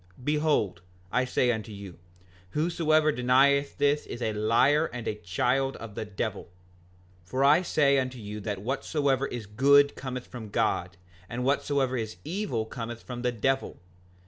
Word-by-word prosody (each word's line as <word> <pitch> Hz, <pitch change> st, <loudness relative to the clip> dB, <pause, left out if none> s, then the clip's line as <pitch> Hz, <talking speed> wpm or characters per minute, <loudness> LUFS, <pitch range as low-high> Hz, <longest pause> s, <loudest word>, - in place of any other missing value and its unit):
Behold, 150 Hz, -, +1 dB, 0.3 s
I 125 Hz, +1 st, +2 dB
say 125 Hz, -1 st, +2 dB
unto 110 Hz, -1 st, -4 dB
you, 100 Hz, -4 st, -10 dB, 0.6 s
whosoever 155 Hz, -1 st, +2 dB
denieth 140 Hz, +2 st, +3 dB
this 145 Hz, +1 st, +1 dB
is -, -, -6 dB
a 110 Hz, -3 st, -1 dB
liar 120 Hz, +9 st, +3 dB
and 120 Hz, -1 st, -6 dB
a -, -, 0 dB
child 125 Hz, +8 st, 0 dB
of 115 Hz, -2 st, -9 dB
the 110 Hz, -, -4 dB
devil. 105 Hz, 0 st, -4 dB, 0.8 s
5:40 -, -, -25 dB
For 130 Hz, +5 st, 0 dB
I 145 Hz, +5 st, +6 dB
say 140 Hz, -6 st, +3 dB
unto 130 Hz, -1 st, -3 dB
you 105 Hz, -1 st, -7 dB
that 100 Hz, -2 st, -4 dB
whatsoever 140 Hz, +1 st, 0 dB
is 120 Hz, -3 st, -6 dB
good 140 Hz, +7 st, +4 dB
cometh 130 Hz, -2 st, -5 dB
from 115 Hz, -4 st, -9 dB
God, 90 Hz, -5 st, -1 dB, 0.3 s
and 120 Hz, +2 st, -3 dB
whatsoever 135 Hz, -1 st, +1 dB
is 110 Hz, -2 st, -4 dB
evil 150 Hz, -, -2 dB
cometh 115 Hz, 0 st, -7 dB
from 125 Hz, -1 st, -6 dB
the 125 Hz, 0 st, +1 dB
devil. 135 Hz, +4 st, -1 dB
125 Hz, 160 wpm, -28 LUFS, 110-140 Hz, 0.8 s, I